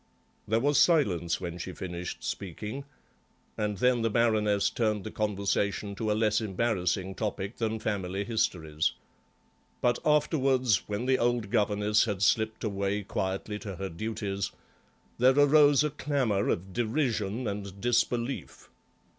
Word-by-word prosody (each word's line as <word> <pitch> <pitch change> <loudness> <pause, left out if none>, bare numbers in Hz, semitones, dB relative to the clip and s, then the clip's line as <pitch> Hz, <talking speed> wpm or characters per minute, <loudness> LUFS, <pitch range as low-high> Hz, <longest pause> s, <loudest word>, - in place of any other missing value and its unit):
There 110 +2 +2
was 145 +3 +3
silence 95 - +3
when 90 -2 -5
she 90 +2 -5
finished 90 -1 -6
speaking, 105 - -5 0.7
and 105 -1 -2
then 125 +3 +3
the 115 - +1
Baroness 105 -3 +2
turned 110 -4 0
the 110 - -6
conversation 100 -1 -1
to 110 +2 -2
a 105 - +1
less 110 0 +2
embarrassing 95 -3 -1
topic 100 +1 -4
than 110 -1 -1
family 100 -3 -2
histories. 90 -9 0 0.9
But 120 -1 +2
afterwards, 135 -6 +2
when 105 +4 -2
the 130 0 +2
old 120 -4 0
governess 105 0 +2
had 100 -3 -2
slipped 110 +2 +1
away 100 -1 -1
quietly 95 +2 -3
to 100 -3 -6
her 95 +2 -4
duties, 100 +1 -3 0.7
there 130 +3 +5
arose 145 0 +6
a 150 - 0
clamour 135 -9 0
of 95 +2 -2
derision 115 -2 -1
and 100 -1 -5
disbelief. 120 - -1
105 Hz, 135 wpm, -29 LUFS, 100-120 Hz, 0.9 s, arose